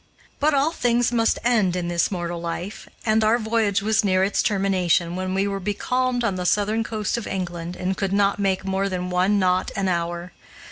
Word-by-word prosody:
But 295 0 +3
all 280 +4 +2
things 245 -5 +1
must 230 -1 +2
end 220 -7 +2
in 180 -1 -2
this 175 -1 +1
mortal 175 -2 -4
life, 175 +4 -5 0.2
and 220 0 +3
our 220 +2 +4
voyage 220 -3 0
was 220 0 +2
near 185 -2 +2
its 195 +1 +1
termination, 185 -4 +1
when 185 0 -2
we 195 +1 +1
were 195 -1 -2
becalmed 245 +5 -1
on 200 -5 0
the 180 - -3
Southern 210 +3 +1
coast 215 0 -2
of 235 - -7
England 175 -2 -4
and 190 +1 -2
could 195 0 -2
not 200 0 +2
make 195 -1 0
more 195 +1 0
than 180 -1 -3
one 185 +3 +2
knot 185 -1 +1
an 195 -1 0
hour. 175 0 -2
195 Hz, 200 wpm, -23 LUFS, 180-220 Hz, 0.2 s, our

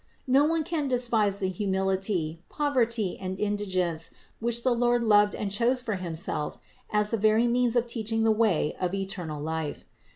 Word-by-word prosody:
No 270 +2 +4
one 325 0 +1
can 305 -2 -2
despise 235 -6 +2
the 195 -2 -1
humility, 190 -3 -1
poverty 235 -9 0
and 190 0 -4
indigence, 185 -6 -1 0.3
which 235 +1 -1
the 255 - +3
Lord 240 0 +2
loved 210 -2 +4
and 200 -2 -3
chose 235 +5 +1
for 225 -5 -3
Himself 165 -3 -3 0.3
as 210 0 +1
the 230 - +1
very 220 +3 +3
means 245 0 +2
of 240 -1 +3
teaching 225 -1 -2
the 225 - +4
way 215 -9 +1
of 185 +1 -1
eternal 185 -6 -4
life. 160 0 -4
210 Hz, 165 wpm, -27 LUFS, 190-235 Hz, 0.3 s, No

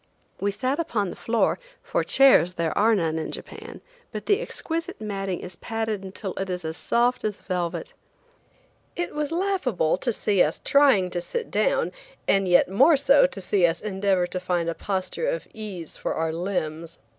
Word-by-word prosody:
We 200 - 0
sat 255 +8 -1
upon 220 - -1
the - - -8
floor, 230 0 +1 0.2
for - - 0
chairs 265 -10 +5
there 165 -1 -1
are 225 +2 +4
none 160 -4 0
in 160 - -4
Japan, - - -9 0.3
but 215 -3 -6
the 410 +2 +2
exquisite 330 -8 -4
matting 195 -3 -3
is 180 -1 -9
padded 220 -3 -3
until 190 0 -6
it 195 0 -3
is 180 -2 -4
as 160 0 -3
soft 245 +6 +1
as 210 -2 -2
velvet. 175 -3 -3 1.0
It 350 - -3
was 300 0 -2
laughable 330 - 0
to 240 +6 0
see 205 -3 +1
us 150 - +2
trying 265 -11 +4
to 175 - -2
sit 465 - -4
down, - - +1 0.4
and 195 -1 +3
yet 175 0 +5
more 270 - +5
so 275 0 +5
to 210 - -7
see 190 0 +1
us 165 0 -2
endeavor 195 -3 0
to 185 +1 -3
find 180 -2 -1
a - - -1
posture 195 - -2
of - - -3
ease 195 -7 -7
for - - -3
our 160 0 -1
limbs. 165 -2 -3
200 Hz, 180 wpm, -25 LUFS, 180-255 Hz, 1.0 s, chairs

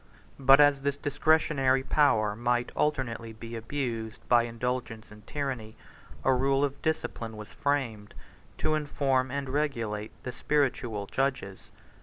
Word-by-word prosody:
But 135 +1 +7
as 145 -1 +5
this 140 0 -1
discretionary 145 -3 +2
power 110 -9 +3
might 120 +1 0
alternately 125 -6 -1
be 115 +1 -8
abused 115 -2 -4
by 120 -1 +5
indulgence 115 -2 -4
and 105 0 -15
tyranny, 130 -7 -4 0.5
a 130 - +4
rule 135 +2 +2
of 140 0 -6
discipline 115 -8 -3
was 105 0 -9
framed, 120 -8 -2 0.4
to 155 - 0
inform 140 -3 +1
and 140 +1 -3
regulate 115 -7 -2
the 125 - -4
spiritual 120 -8 0
judges. 130 -6 -2
130 Hz, 130 wpm, -28 LUFS, 115-140 Hz, 0.5 s, But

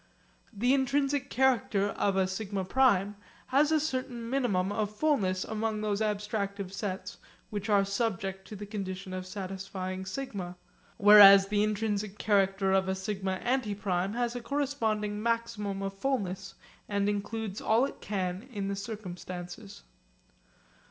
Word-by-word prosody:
The 240 +5 +2
intrinsic 275 0 +1
character 240 -6 +2
of 200 -1 0
a 190 - +3
σ 190 +4 -4 0.2
prime 205 -5 +3 0.3
has 285 +4 +3
a 315 - +4
certain 255 -5 -3
minimum 205 -8 +1
of 210 0 -2
fullness 205 -10 +1
among 220 0 -2
those 210 0 -1
abstractive 205 -2 -2
sets 195 -2 -4 0.3
which 205 0 -4
are 200 -1 +4
subject 195 -2 -2
to 215 - -8
the 205 +1 -7
condition 195 -2 -5
of 185 0 -5
satisfying 190 -1 -5
σ; 265 +8 -4 0.7
whereas 200 -1 +9
the 205 0 +2
intrinsic 210 -1 -1
character 195 -2 +2
of 190 0 +2
a 190 - 0
σ 195 +1 -4
antiprime 200 -2 -1
has 240 0 -1
a 245 - -4
corresponding 225 -6 -1
maximum 230 -4 -1
of 195 0 -3
fullness, 195 -5 -2 0.3
and 200 -1 +1
includes 205 0 -3
all 225 +4 +3
it - - -8
can 190 +3 -3
in 200 -3 -3
the 200 - -1
circumstances. 195 -1 -7
205 Hz, 140 wpm, -30 LUFS, 195-230 Hz, 0.7 s, whereas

